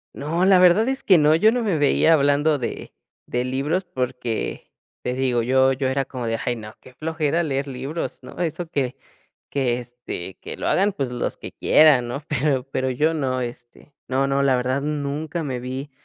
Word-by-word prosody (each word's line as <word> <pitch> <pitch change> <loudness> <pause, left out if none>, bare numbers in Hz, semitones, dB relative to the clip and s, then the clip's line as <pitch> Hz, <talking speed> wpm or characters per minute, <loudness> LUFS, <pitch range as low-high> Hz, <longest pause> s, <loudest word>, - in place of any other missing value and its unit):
No, 165 +5 0
la 190 -1 +6
verdad 185 +5 +5
es 265 0 -2
que 185 - +6
no, 155 0 +5
yo 215 +7 +5
no 245 +1 0
me 200 -8 0
veía 150 +2 +4
hablando 145 +1 +3
de 125 - -5 0.3
de 125 0 -1
libros, 140 +8 -1
porque, 125 -7 -4 0.3
te 125 - -2
digo, 125 -2 +1
yo 130 +2 +3
yo 130 0 -1
era 135 +1 0
como 125 -2 -6
de: 115 0 -1
"Ay 120 - 0
no, 110 -2 -9
qué 130 - -16
flojera 160 +3 -1
leer 140 -2 -2
libros", 135 +5 -5
¿no? - - -11
Eso 175 0 -2
que 135 -5 -2 0.6
que, 125 -4 0
este, 120 -7 -7
que - - -7
lo - - -4
hagan 200 +2 +2
pues 135 -6 -3
los 120 - -2
que - - -9
quieran, 140 -6 +5
¿no? 140 +5 -5
Pero 140 -2 0
pero 130 0 0
yo 150 +6 +1
no, 130 -4 -1
este. 120 +3 -8
No, 135 +1 +1
no, 140 0 +1
la 135 -2 +3
verdad 130 +2 -1
nunca 150 +2 -3
me 130 -4 -3
vi 130 +3 -5
140 Hz, 200 wpm, -23 LUFS, 125-155 Hz, 0.6 s, la